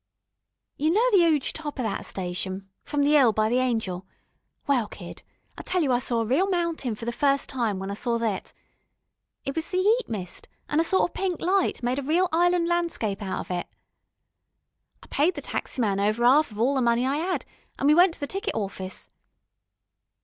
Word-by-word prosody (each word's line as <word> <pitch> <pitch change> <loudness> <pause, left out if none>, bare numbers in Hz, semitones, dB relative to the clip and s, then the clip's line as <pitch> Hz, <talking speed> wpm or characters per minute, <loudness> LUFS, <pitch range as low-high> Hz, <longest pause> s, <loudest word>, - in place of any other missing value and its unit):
You 305 +2 +1
know 435 +9 +3
the 400 - +6
'uge 295 -3 0
top 295 -3 -6
o' - - 0
thet 220 -3 -3
station 190 +1 -4 0.2
from 290 -1 -1
the 295 +1 +4
'ill 255 -5 +6
by 215 +1 +1
the 245 +2 +2
Angel 220 -8 -1 0.6
well, 255 -7 +2
kid, - - -10 0.4
I - - -4
tell 365 -2 0
you 275 - +1
I 245 - +3
saw 240 -2 -1
a - - -1
reel 280 - +2
mountain 335 - -1
for 230 - -8
the 235 - -1
first 275 +2 +1
time, 230 -7 -1
when 195 +1 -4
I - - -2
saw 235 +3 -1
thet. 225 -4 -2 0.9
It 275 - -3
was 320 0 -3
the 365 - -1
'eat 430 +5 +2
mist, 190 -6 -6 0.2
an' 300 - +1
a - - +4
sort 355 0 +2
o' - - -33
pink 370 -3 -2
light 370 -6 +1
made 250 +3 0
a - - -2
reel 330 +7 +2
'ighland 350 0 +3
landscape 335 - -1
out 190 -2 -3
of - - -9
it. 175 -1 -2 1.4
I - - -15
paid 310 +6 +2
the - - -5
taxi - - -4
man 200 -4 +1
over 215 +4 +1
'alf 290 +5 +5
of 210 -1 -10
all 255 +5 +3
the 265 - +1
money 235 +1 +2
I 275 +2 0
'ad, 365 +3 -2 0.3
an' - - -2
we 295 - +6
went 350 +1 +5
to - - -21
the 285 - -2
ticket 390 +7 -3
awfice. 195 -3 -5
265 Hz, 210 wpm, -26 LUFS, 220-335 Hz, 1.4 s, the